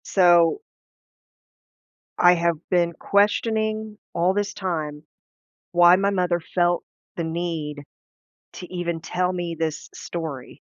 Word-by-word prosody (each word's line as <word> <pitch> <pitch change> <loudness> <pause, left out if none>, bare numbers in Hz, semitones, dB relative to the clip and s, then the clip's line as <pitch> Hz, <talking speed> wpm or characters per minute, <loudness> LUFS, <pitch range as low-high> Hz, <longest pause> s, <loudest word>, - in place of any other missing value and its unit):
So 175 - +4 1.6
I 175 0 +6
have 170 -1 +1
been 175 -2 +2
questioning 215 +3 0 0.2
all 175 +3 +2
this 205 0 -1
time 155 -6 -4 0.7
why 175 0 +7
my 200 +2 +1
mother 180 -3 +1
felt 175 +1 0 0.3
the 170 - -3
need 160 -3 -3 0.7
to 180 - -8
even 170 -2 -3
tell 180 +1 -1
me 175 -2 -3
this 160 -1 -4
story, 155 -7 -7
175 Hz, 110 wpm, -23 LUFS, 165-185 Hz, 1.6 s, why